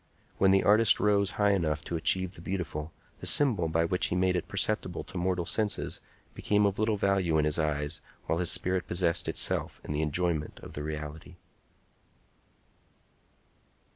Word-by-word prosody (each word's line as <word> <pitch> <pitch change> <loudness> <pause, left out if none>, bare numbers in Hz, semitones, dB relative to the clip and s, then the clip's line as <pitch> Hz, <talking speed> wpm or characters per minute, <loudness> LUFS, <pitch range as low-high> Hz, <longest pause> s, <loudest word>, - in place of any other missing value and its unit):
When 95 - +4
the 95 0 +4
artist 105 +1 +5
rose 100 -2 +2
high 105 -1 +3
enough 80 -6 -1
to 85 - -4
achieve 95 +3 +1
the 85 - -11
beautiful, 80 -4 -4 0.3
the - - -3
symbol 115 - +4
by 80 +1 +1
which 90 +2 0
he - - -2
made 90 0 +1
it 90 - -2
perceptible 100 -3 0
to - - -15
mortal 90 -1 -1
senses 105 +2 -1 0.3
became 105 0 +1
of 100 0 -1
little 110 -1 +1
value 95 -5 +1
in 75 - +2
his 75 +2 +1
eyes 75 -2 -1 0.2
while 80 - -1
his 90 -1 +1
spirit 90 -1 +1
possessed 85 -1 0
itself - - 0
in - - -7
the 75 +1 -1
enjoyment 80 0 -1
of - - -10
the 75 - -4
reality. 75 +2 -7
90 Hz, 170 wpm, -28 LUFS, 80-100 Hz, 0.3 s, artist